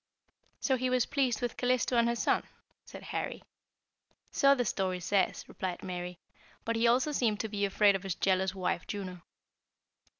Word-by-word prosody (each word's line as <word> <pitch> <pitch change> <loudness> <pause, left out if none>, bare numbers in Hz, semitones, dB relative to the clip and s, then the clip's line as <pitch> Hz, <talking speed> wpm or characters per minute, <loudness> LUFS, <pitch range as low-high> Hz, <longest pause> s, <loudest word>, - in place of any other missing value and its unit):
"So 265 -2 +2
he 255 +1 0
was 250 -2 +2
pleased 255 -4 0
with 240 - -2
Calisto 250 0 +1
and 235 0 +4
her 235 - +1
son?" - - +2 0.4
said - - -10
Harry. - - -4 0.9
"So 275 0 +5
the 245 -2 0
story 185 -3 -1
says," 190 +1 0
replied 185 -2 -5
Mary. 180 -1 -5 0.5
"But 230 - 0
he 230 +1 +3
also 255 +5 +3
seemed 225 -7 +1
to 220 - -3
be 205 -1 0
afraid 200 0 +4
of 195 - -2
his 190 -3 -3
jealous 190 0 +1
wife 180 -2 -2
Juno. 185 -4 -5
210 Hz, 170 wpm, -31 LUFS, 190-245 Hz, 0.9 s, So